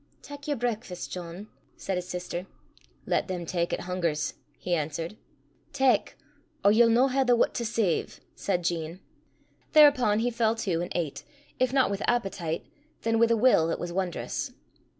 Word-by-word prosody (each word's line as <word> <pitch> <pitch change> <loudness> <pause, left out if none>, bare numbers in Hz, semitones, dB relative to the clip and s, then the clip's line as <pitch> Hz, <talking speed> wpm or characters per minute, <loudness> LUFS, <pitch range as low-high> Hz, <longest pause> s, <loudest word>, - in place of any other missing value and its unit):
"Tak 285 0 -10
yer 295 - +1
brakfast, 230 -6 -3
John," 180 +3 -7 0.3
said 190 - -3
his 180 0 -3
sister. 180 0 -4 0.6
"Lat - - 0
them 180 -3 -4
tak 170 0 -1
'at - - -2
hungers," 170 -4 -1 0.2
he 180 - -3
answered. 165 +3 -2 0.6
"Tak, 265 -1 +2 0.5
or 200 - +8
ye'll 230 +2 +6
no 240 +4 +5
hae 270 +1 +2
the 245 -2 +4
wut 235 - +2
to 235 - -2
save," 220 -6 -1
said 180 -3 -1
Jean. 165 0 -2 0.7
Thereupon 285 -9 +6
he 240 +2 +1
fell 230 -1 +1
to, 180 -7 -1
and 175 - -4
ate, 165 -5 -2 0.4
if 255 -1 +2
not 265 -6 +3
with 200 - -3
appetite, 190 -8 -1 0.4
then 225 0 +2
with 230 0 +5
a 230 - +3
will 215 -9 +5
that 165 - -1
was 175 0 -5
wondrous. 185 -1 -2
195 Hz, 170 wpm, -28 LUFS, 175-235 Hz, 0.7 s, or